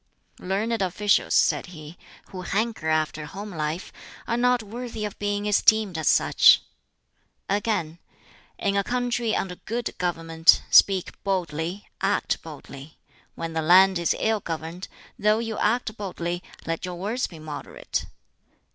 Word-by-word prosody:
"Learned 210 +4 -1
officials," 200 +2 +2
said - - +3
he, 155 -2 -11 0.3
"who 185 -2 -7
hanker 205 -2 -1
after 155 0 0
a - - -6
home 205 +6 -7
life, 160 +1 -4 0.3
are 235 - 0
not 245 -1 +2
worthy 225 0 -6
of 205 - -7
being 205 0 -1
esteemed 210 -1 +3
as 160 -2 -2
such." - - +6 0.8
Again, 195 -5 -1 0.6
"In 200 0 0
a 200 - +2
country 245 -1 -1
under 180 -2 -3
good 235 +1 -4
government, 165 -2 +3
speak 190 -2 +4
boldly, 180 -1 -2
act 200 +1 0
boldly. 145 -1 -11 0.4
When 165 -1 -5
the 160 - 0
land 185 +3 +6
is 170 - +1
ill 220 -1 +1
governed, 165 +1 -6 0.3
though 210 +1 +3
you 225 -1 -3
act 220 0 0
boldly, 175 -3 -4 0.2
let 165 0 -3
your 180 -1 -4
words 215 +8 -2
be 170 - -12
moderate." 155 -1 -5
190 Hz, 140 wpm, -25 LUFS, 165-215 Hz, 0.8 s, such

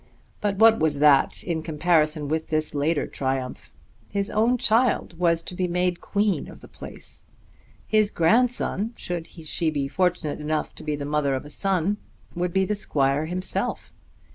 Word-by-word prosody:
But 205 -1 0
what 225 +2 +6
was 155 -2 +1
that 145 -1 +4
in 165 -3 -2
comparison 155 -1 +1
with 160 +2 -1
this 155 0 -1
later 150 +2 +1
triumph? 130 -1 -4 0.4
His 200 0 -1
own 230 +4 +3
child 225 -7 +1
was 170 -2 +2
to - - -7
be 180 0 -1
made 180 0 0
queen 205 -1 0
of - - -12
the - - -12
place! - - -9 0.6
His 215 -1 +3
grandson, 225 +3 +1
should 175 -2 -4
she 165 0 -2
be 145 -3 -1
fortunate 180 -1 0
enough 155 +1 -2
to - - -11
be 150 -1 -1
the 145 -1 -5
mother 145 -2 +1
of 130 - -5
a 145 - -10
son, 195 +2 0 0.4
would 175 0 -1
be 190 +2 +2
the 210 - -1
squire 145 -6 0
himself! 180 +2 -2
170 Hz, 165 wpm, -25 LUFS, 150-195 Hz, 0.6 s, what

